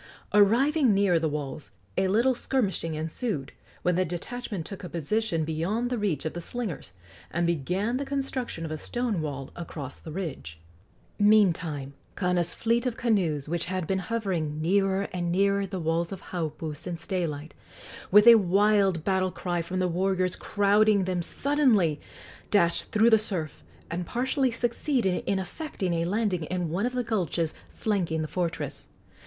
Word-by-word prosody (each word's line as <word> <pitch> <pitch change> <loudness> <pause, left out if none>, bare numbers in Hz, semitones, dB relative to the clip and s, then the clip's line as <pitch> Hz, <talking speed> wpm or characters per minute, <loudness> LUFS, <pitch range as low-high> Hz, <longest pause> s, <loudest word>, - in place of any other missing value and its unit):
Arriving 240 +5 +4
near 195 -4 +3
the 160 -1 0
walls, 145 -1 -5 0.3
a 190 - +2
little 235 +7 +3
skirmishing 200 -10 -1
ensued, 155 - -3 0.3
when 180 - +3
the 185 - +3
detachment 185 +2 -5
took 195 +1 -8
a 180 - -6
position 170 +1 -1
beyond 190 +10 -1
the 250 - 0
reach 175 -9 -1
of 160 - -2
the 175 - -5
slingers, 205 - -5 0.4
and 170 +1 0
began 180 - 0
the 280 - -2
construction 270 -10 -3
of 160 - -5
a 155 - -4
stone 240 -5 -2
wall 140 -3 -5
across 150 -5 -7
the 160 - -9
ridge. 150 - -5 0.6
Meantime 170 -9 +3 0.2
Kana's 180 -2 0
fleet 235 +2 +1
of 235 - -3
canoes, 175 - +1
which 170 +1 -2
had 185 -1 -2
been 190 +3 0
hovering 180 -7 -2
nearer 195 +3 +2
and 175 -1 -1
nearer 200 +2 +2
the 190 0 -4
walls 165 +1 0
of 195 -1 -8
Haupu 160 -3 -3
since 170 +2 -6
daylight, 160 -5 -3 0.6
with 210 +2 +7
a 235 - +11
wild 195 -2 +3
battle 190 0 +1
cry 175 -1 -2
from 180 +3 -4
the 185 0 +2
warriors 185 +1 0
crowding 205 0 +3
them 180 -1 -1
suddenly 220 - +2 0.5
dashed 170 -5 +3
through 225 +2 +4
the 220 - +7
surf, 175 -8 -3 0.3
and 175 0 -3
partially 260 +2 +1
succeeded 235 -3 0
in 200 - +2
effecting 190 - -3
a 165 0 0
landing 190 -3 0
in 180 0 -2
one 195 +8 0
of 250 - -4
the 250 -1 0
gulches 175 -8 -1 0.2
flanking 175 -7 -1
the - - -3
fortress. 175 0 -3
185 Hz, 160 wpm, -27 LUFS, 165-215 Hz, 0.6 s, a